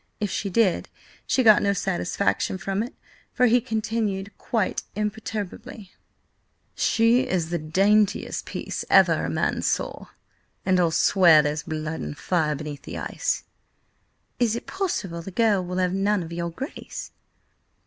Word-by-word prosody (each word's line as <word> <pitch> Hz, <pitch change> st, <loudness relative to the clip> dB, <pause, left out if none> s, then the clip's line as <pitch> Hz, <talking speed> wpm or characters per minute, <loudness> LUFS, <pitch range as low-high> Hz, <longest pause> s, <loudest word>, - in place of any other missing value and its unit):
If 205 Hz, -3 st, -2 dB
she 200 Hz, -, -2 dB
did, 195 Hz, -1 st, +1 dB, 0.4 s
she 260 Hz, -, +2 dB
got 215 Hz, -3 st, +7 dB
no 200 Hz, -, +2 dB
satisfaction 190 Hz, 0 st, -1 dB
from 195 Hz, +1 st, -2 dB
it, 235 Hz, -, -6 dB, 0.4 s
for 250 Hz, -, +3 dB
he 245 Hz, +1 st, +4 dB
continued, 215 Hz, -3 st, -2 dB
quite 220 Hz, -5 st, -1 dB
imperturbably: 210 Hz, -1 st, -5 dB, 0.8 s
"She 230 Hz, +3 st, +3 dB
is 170 Hz, -3 st, -1 dB
the 175 Hz, -, 0 dB
daintiest 195 Hz, +6 st, +1 dB
piece -, -, -4 dB
ever -, -, +5 dB
a -, -, -2 dB
man -, -, 0 dB
saw, -, -, -2 dB, 0.6 s
and 185 Hz, -1 st, +3 dB
I'll 170 Hz, -2 st, +3 dB
swear 165 Hz, -2 st, +5 dB
there's 150 Hz, +1 st, -1 dB
blood 155 Hz, 0 st, -4 dB
and 75 Hz, 0 st, -6 dB
fire 160 Hz, -4 st, 0 dB
beneath 150 Hz, 0 st, -7 dB
the -, -, -7 dB
ice!" -, -, -2 dB, 1.0 s
"Is 235 Hz, -2 st, +2 dB
it 235 Hz, -, -5 dB
possible 350 Hz, -, -3 dB
the 170 Hz, -, -8 dB
girl 205 Hz, -1 st, +2 dB
will 180 Hz, +1 st, -4 dB
have 180 Hz, -1 st, +1 dB
none 195 Hz, 0 st, +1 dB
of 165 Hz, 0 st, -8 dB
your 170 Hz, 0 st, -2 dB
Grace?" 265 Hz, -, -7 dB
195 Hz, 150 wpm, -25 LUFS, 170-220 Hz, 1.0 s, got